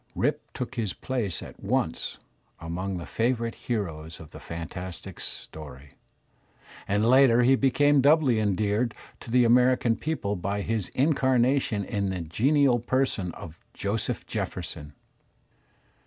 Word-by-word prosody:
Rip - - -1
took 125 - -5
his 110 -6 -2
place 115 -10 -3
at - - -11
once - - -1 0.4
among 90 +3 -4
the 85 - -6
favourite 115 - 0
heroes 80 -9 -4
of 80 - -12
fantastic 85 +2 -7
story, 70 -3 -8 1.0
and 105 +3 +2
later 125 -1 +6
he 130 +2 +5
became 140 +2 +3
doubly 140 -5 +4
endeared 105 +3 0 0.2
to - - -11
the 125 +1 +4
American 125 0 +4
people 130 -10 -2
by 100 +2 -2
his 110 -2 -2
incarnation 130 -5 +2
in 100 0 -1
the 95 -2 -3
genial 125 - +3
person 120 -7 0
of 85 0 -10 0.2
Joseph 100 +2 -2
Jefferson. 75 0 -5
110 Hz, 125 wpm, -27 LUFS, 95-130 Hz, 1.0 s, later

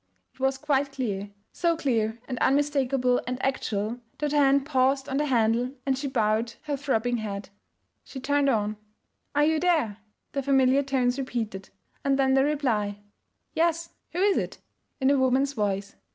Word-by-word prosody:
It - - -28
was 265 0 +1
quite 280 -1 0
clear, 205 -7 -3 0.2
so 340 -1 +1
clear 230 -7 0
and 255 -3 -4
unmistakable 270 -3 +2
and 250 0 -2
actual 230 -3 -1 0.2
that 295 -1 -1
her 295 - +1
hand 275 -1 +4
paused 270 -1 +2
on 270 - -1
the 295 +1 +1
handle 240 +1 +1
and 270 -1 +2
she 275 +2 -3
bowed 225 -2 +1
her 295 -2 -2
throbbing 245 -4 0
head. 200 -3 -5 0.5
She 265 - -8
turned 285 +1 +2
on; 215 -3 0 0.6
'Are 295 0 +4
you 315 0 +2
there?' 310 - +1 0.3
the 275 - -1
familiar 270 0 +4
tones 265 -2 0
repeated. 225 -7 -4 0.3
And 275 -1 +2
then 265 -1 +3
the 270 0 +4
reply, 240 -9 0 0.6
'Yes, 335 0 +1 0.2
who 350 - -2
is 400 0 +4
it?' - - -4 0.4
in 265 0 +3
a 280 - +3
woman's 260 +2 +2
voice. 200 -4 -2
265 Hz, 165 wpm, -26 LUFS, 230-280 Hz, 0.6 s, hand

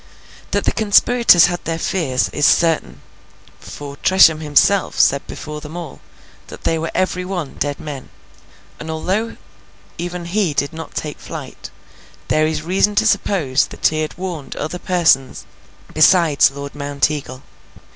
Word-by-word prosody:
That - - -1
the - - +1
conspirators 220 -3 +5
had 175 -1 -3
their 165 0 -3
fears, 150 -8 -1
is 150 - +2
certain; 155 - +1 0.6
for, 140 -1 -9
Tresham 175 -4 +5
himself 160 +6 +2
said 140 0 +3
before 150 0 -7
them 155 +3 -9
all, 170 -5 -8 0.5
that - - -12
they 165 - 0
were 165 - -3
every 185 -1 0
one 180 -6 -5
dead 145 -1 -2
men; 140 -4 -8 0.7
and, 160 - -8
although 190 +8 -2 0.6
even 175 0 -5
he 175 -3 -1
did 140 +3 -1
not 160 0 -9
take 150 -2 -5
flight, - - -9 0.6
there 155 0 +2
is 155 -1 -3
reason 195 +4 +1
to 215 +1 +2
suppose 185 -10 +1
that - - -8
he 155 0 -2
had 155 - -5
warned 175 -7 -6
other 155 +4 -5
persons 165 -9 +1 0.5
besides 155 -2 +5
Lord 140 +1 -8
Mounteagle. 140 -2 -2
160 Hz, 145 wpm, -18 LUFS, 145-180 Hz, 0.7 s, conspirators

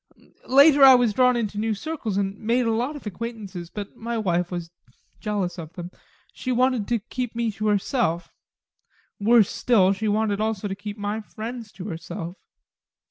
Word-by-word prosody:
Later 280 +2 +7
I 265 -1 +10
was 245 -4 +3
drawn 250 +2 +4
into 210 -3 -2
new 220 0 0
circles 265 -6 -4
and 195 -1 -1
made 235 +3 +1
a 230 - +2
lot 245 +7 -1
of 290 - -10
acquaintances, 205 -4 -6
but 205 +1 -7
my 235 +1 -4
wife 175 -4 0
was 175 -2 -5 0.5
jealous 200 -4 -2
of 160 0 -8
them 175 0 -7 0.4
she 255 - -4
wanted 250 -3 +2
to 240 - +1
keep 240 +2 -5
me 235 -1 0
to 215 +1 -3
herself: 205 - 0 0.9
worse 220 0 +5
still 195 -6 +3
she 215 +2 -3
wanted 210 -1 +1
also 215 -2 -1
to 195 - -3
keep 205 +1 -7
my 205 +2 -3
friends 225 +1 -7
to 185 - -8
herself. 165 -1 -6
215 Hz, 175 wpm, -24 LUFS, 195-240 Hz, 0.9 s, I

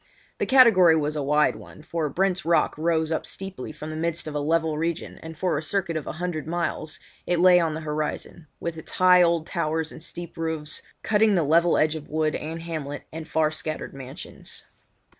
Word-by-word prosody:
The - - 0
category 225 -11 +7
was 150 -1 0
a 150 - -1
wide 150 +2 +3
one, 150 - -12
for 165 -2 -2
Brent's 190 +4 0
Rock 170 0 +2
rose 160 0 0
up 160 - 0
steeply 190 -9 -6
from 155 0 -7
the - - -5
midst 165 +1 -2
of 155 - -5
a 150 - -1
level 160 +1 +1
region 165 +2 -3
and 160 -1 -9
for 170 -3 0
a - - -5
circuit 170 +1 0
of 155 - -3
a - - -3
hundred 160 -2 -4
miles 170 -2 -2 0.3
it 175 -1 +1
lay 180 0 +7
on 165 -3 0
the 160 - -5
horizon, 155 +1 -4
with 165 -1 -4
its - - -11
high 180 0 +6
old 170 -2 +3
towers 160 -2 -2
and - - -11
steep 170 +1 -8
roofs 160 -2 -2 0.2
cutting 215 -1 +3
the 170 - +3
level 165 +3 +4
edge 155 0 +3
of 155 -2 -8
wood 155 0 0
and 165 +2 -5
hamlet, 155 -4 -5
and 160 0 -6
far 160 -1 +1
scattered 155 0 -4
mansions. 135 -1 -10
160 Hz, 205 wpm, -25 LUFS, 155-170 Hz, 0.3 s, category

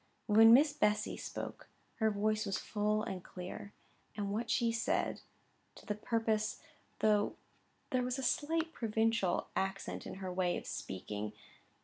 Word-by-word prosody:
When 225 +2 +8
Miss 290 +5 +7
Bessy 210 -7 +1
spoke, - - -6 0.3
her 220 -2 +3
voice 215 +1 0
was 195 - 0
full 210 0 0
and 190 -4 -4
clear, 185 +2 -7 0.5
and 200 -1 -1
what 225 +3 -2
she 235 -2 +2
said, 230 0 0 0.5
to - - -14
the 210 - -1
purpose, 220 0 0 0.4
though 210 -1 +3 0.6
there 255 - +2
was 250 +1 -1
a 265 - -3
slight 325 +4 0
provincial 225 - +1
accent 190 +1 -2
in - - -6
her 190 -1 -5
way 180 -1 +1
of - - -7
speaking. 105 +3 -5
215 Hz, 145 wpm, -34 LUFS, 200-230 Hz, 0.6 s, When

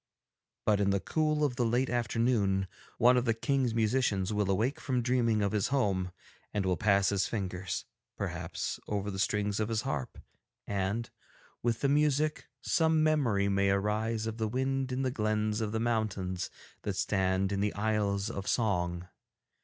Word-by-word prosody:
But 105 -2 +3
in 100 -1 +2
the 100 0 +2
cool 155 +5 0
of 130 -4 0
the 125 - +2
late 120 +3 +1
afternoon, 115 -5 +1 0.3
one 125 +2 +5
of 125 - +1
the 115 -2 +2
King's 130 -1 0
musicians 110 -4 +1
will 105 -2 0
awake 115 +10 +1
from 130 -5 -1
dreaming 115 -3 +2
of 100 - +1
his 105 -2 +1
home 100 -9 0 0.4
and 100 -2 -1
will 95 -1 +2
pass 100 -2 +3
his 100 -1 +1
fingers, 95 -4 -3 0.3
perhaps, - - -3
over 105 0 -2
the 95 - -5
strings 105 0 0
of 110 0 0
his 110 -1 0
harp 70 -3 -3 0.5
and, 100 +3 -2 0.5
with 115 -2 0
the 140 - +3
music, 150 +1 +2
some 160 -1 +2
memory 125 -11 +2
may 100 0 +2
arise 105 +3 0
of 110 0 -4
the 110 - +1
wind 130 +2 -1
in 130 +1 -1
the 130 - 0
glens 110 -1 0
of 105 -1 -1
the 110 - -1
mountains 105 -6 -1 0.3
that - - -3
stand 95 -1 +1
in 100 - -1
the 105 +1 0
Isles 100 -1 0
of 100 0 -5
Song. 90 -6 0
110 Hz, 170 wpm, -31 LUFS, 100-125 Hz, 0.5 s, one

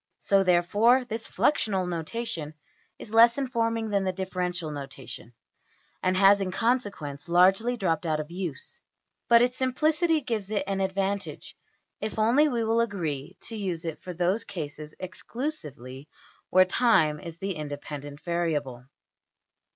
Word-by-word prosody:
So, 195 -1 +3
therefore, 205 +8 +4
this 225 -1 -4
fluxional 195 -10 +1
notation 165 -2 -4 0.4
is 215 - -10
less 235 +2 +7
informing 230 -4 -1
than 200 -1 +1
the 190 - 0
differential 180 -3 -3
notation, 135 -4 -8 0.7
and 185 0 +1
has 200 +1 +6
in 190 - -1
consequence 195 - -1
largely 195 +8 +4
dropped 170 -5 0
out 155 -1 +1
of 155 +2 -6
use. 175 -6 -5 0.5
But 235 0 +7
its 250 +1 0
simplicity 310 +5 +2
gives 220 -6 -3
it 215 -2 0
an 195 0 -2
advantage 195 +1 -2 0.4
if 215 - -4
only 240 +8 +4
we 240 -5 0
will 225 +1 +2
agree 175 -7 -3
to 225 - -7
use 185 -6 -3
it 160 -2 -5
for 180 - -6
those 180 +5 +1
cases 155 -3 -7
exclusively 150 - -6 0.4
where 185 0 +6
\emph{time} 180 -8 +3
is 170 -1 -8
the 195 +2 -3
independent 145 -1 -7
variable. 150 -8 -2
190 Hz, 140 wpm, -27 LUFS, 160-230 Hz, 0.7 s, less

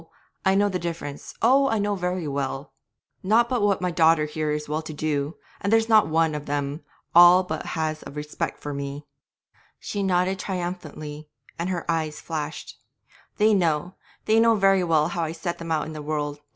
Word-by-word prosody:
I 190 0 +3
know 205 +1 +4
the 185 -2 -2
difference; 165 -4 -6
oh! 270 +4 +5
I 225 - +1
know 205 0 0
very 180 -3 -2
well 140 0 -3 0.5
not 225 +5 +3
but 245 -2 0
what 205 -2 +2
my 180 -1 0
daughter 160 -2 +4
here 155 0 -3
is 150 0 -2
well 155 +2 -2
to 155 -1 -8
do, 150 0 -2 0.2
and 200 - -1
there's 225 0 +4
not 220 -2 +5
one 160 0 +2
of 150 0 -5
them 145 +1 -2 0.3
all 175 +2 +8
but 160 -3 -4
has 155 -1 -2
a - - -8
respect 150 +1 -4
for 145 - -5
me.' 140 +1 -5 0.7
She 205 - -4
nodded 185 -1 +2
again - - -6
triumphantly, 155 -5 -5 0.3
and 170 +2 -1
her 175 -3 -3
eyes 160 -2 -1
flashed. 150 -2 -6 0.6
'They 215 0 +4
know, 175 -2 +1 0.3
they 220 +1 +4
know 230 0 +5
very 195 -2 +4
well 160 -2 +2
how 175 0 -3
I 160 -1 -2
set 170 +1 -4
them 165 -1 -6
out 155 -2 +1
in 155 - -7
the 155 - -6
world. 145 -1 -3
165 Hz, 195 wpm, -25 LUFS, 150-190 Hz, 0.7 s, all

